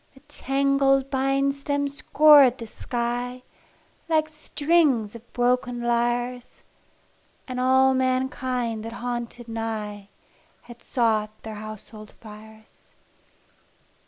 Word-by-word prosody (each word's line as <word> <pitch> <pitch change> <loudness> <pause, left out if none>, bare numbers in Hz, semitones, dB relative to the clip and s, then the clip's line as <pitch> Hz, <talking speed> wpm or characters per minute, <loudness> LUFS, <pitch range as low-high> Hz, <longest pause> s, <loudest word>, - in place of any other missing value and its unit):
The - - -16
tangled 275 -1 +1
bine 270 +1 +1
stems 285 0 -3
scored 285 -2 +6
the 230 - -7
sky 245 +2 -4 0.7
Like 310 -1 +2
strings 300 -7 +1
of 235 0 -13
broken 245 0 0
lyres, 240 +1 -2 0.8
And 255 -1 -4
all 260 +1 +4
mankind 255 -3 -1
that 230 +1 -7
haunted 240 0 -5
nigh 215 -3 -5 0.5
Had 240 -1 -14
sought 220 -4 0
their 220 - -7
household 215 0 -10
fires. 220 0 -15
245 Hz, 100 wpm, -24 LUFS, 230-270 Hz, 0.8 s, scored